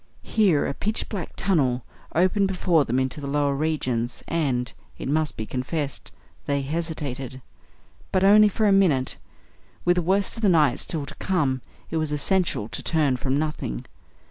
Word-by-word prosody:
Here 190 -10 +2
a - - -2
pitch 215 +9 -2
black 195 -6 -5
tunnel 135 -10 +1 0.3
opened 185 +4 +3
before 175 -5 +2
them 120 - 0
into 130 +3 -2
the 140 - -5
lower 145 0 +1
regions, 130 -6 -1
and 135 -7 -1 0.2
it - - -5
must 155 +1 0
be 110 - -3
confessed 135 +4 -4 0.4
they 140 -1 0
hesitated. 140 -4 -4 0.7
But 185 - +2
only 210 +2 +7
for 215 +2 0
a - - +4
minute. 170 -10 +3 0.7
With 175 0 +3
the - - +3
worst 190 +5 +1
of - - -6
the 210 - +4
night 150 -7 +4
still 155 -4 -2
to - - -8
come 145 -9 0 0.3
it 165 - 0
was 155 -2 -1
essential 150 - +1
to - - -4
turn 150 -5 +2
from 130 +2 0
nothing. 150 - -3
155 Hz, 170 wpm, -24 LUFS, 135-180 Hz, 0.7 s, only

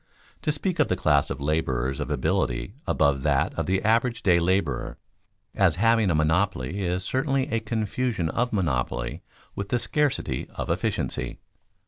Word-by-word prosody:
To 150 - +1
speak 170 +4 -2
of 150 - +4
the 90 - +1
class 75 -6 +2
of - - -4
laborers 70 -3 -1
of - - -3
ability 65 0 0
above 70 -3 +2
that 70 -1 +1
of - - -3
the 95 +1 +1
average 115 +2 +2
day 90 -4 +5
laborer 85 -6 0 0.6
as 95 -5 +3
having 115 +1 +3
a 85 - +2
monopoly 80 +1 +1
is 90 0 -1
certainly 135 +4 0
a 115 - +1
confusion 110 -3 -1
of 120 +8 0
monopoly 65 - -1 0.3
with 100 0 -4
the 125 - +2
scarcity 150 +3 -1
of - - -2
efficiency. - - -2
95 Hz, 155 wpm, -26 LUFS, 75-115 Hz, 0.6 s, day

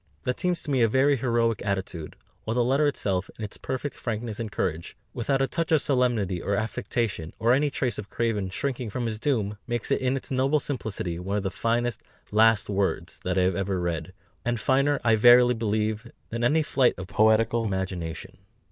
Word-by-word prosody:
That 125 - -2
seems 180 -1 0
to 150 - -4
me 130 -3 +2
a 115 - +5
very 135 +5 +3
heroic 115 -3 +1
attitude; 95 -5 -3 0.3
while 110 - -2
the 125 - +3
letter 135 +5 +3
itself, 95 -9 -1
in 110 - -4
its 105 - -8
perfect 130 +2 -4
frankness 115 -2 -4
and 110 -3 -4
courage, 85 -4 -3 0.2
without 135 +3 0
a - - +1
touch 165 +2 -2
of 160 - +5
solemnity 120 - +1
or 100 - 0
affectation, 110 -5 -2
or 115 +2 +3
any 145 +3 +2
trace 130 -3 -2
of 105 - -7
craven 110 -5 -1
shrinking 125 +3 -3
from 120 +4 -3
his 110 -2 -3
doom, 110 -6 -1
makes 120 -2 -2
it - - +2
in 130 +1 +1
its 135 - -7
noble 135 +3 +2
simplicity 105 -11 -3
one 100 +3 -2
of 100 - -2
the 95 - -2
finest 120 +2 -1 0.3
"last 110 0 +4
words" 100 -1 -1
that 90 +1 -1
I 95 - +4
have 90 0 +1
ever 95 0 -1
read, 85 -1 -3 0.3
and 120 -1 -1
finer, 140 +4 +2
I 115 -1 +4
verily 120 +2 +7
believe, 110 0 -1 0.2
than 115 +1 -3
any 155 +6 +3
flight 130 -4 +2
of 90 - -5
poetical 110 +3 +3
imagination. 95 -5 -4
115 Hz, 200 wpm, -26 LUFS, 100-125 Hz, 0.3 s, verily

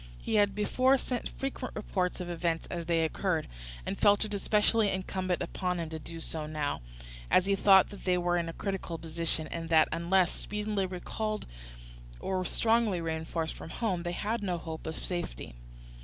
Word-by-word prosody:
He - - -3
had 205 -2 +4
before 255 +6 +3
sent 250 -2 -3
frequent 270 -1 -4
reports 185 -4 -1
of 180 - -4
events 170 -1 -1
as 170 -2 -4
they 165 -1 +3
occurred, 165 0 0 0.4
and - - -3
felt 205 +1 +5
it 210 - -5
especially 210 +1 +3
incumbent 185 -1 -1
upon 180 -2 -2
him 165 -1 -4
to 160 - -4
do 165 +2 -8
so 160 -1 -4
now, 150 - -2 0.5
as 185 - +5
he 200 0 +3
thought 195 -1 +6
that 200 - -10
they 180 -1 +3
were 175 0 +1
in 170 -1 0
a - - -5
critical 190 -4 -3
position, 165 -1 0
and 165 -1 -4
that, 160 -1 +6
unless 175 +2 +3
speedily 210 -2 -2
recalled 215 +4 -3 0.7
or 185 -1 -1
strongly 225 -2 +2
reinforced 160 0 -2
from - - -9
home, 190 -3 -1
they 175 0 -2
had 220 +5 -1
no 185 -4 -1
hope 160 -1 -6
of 160 - -3
safety. 175 - -4
180 Hz, 180 wpm, -30 LUFS, 165-205 Hz, 0.7 s, thought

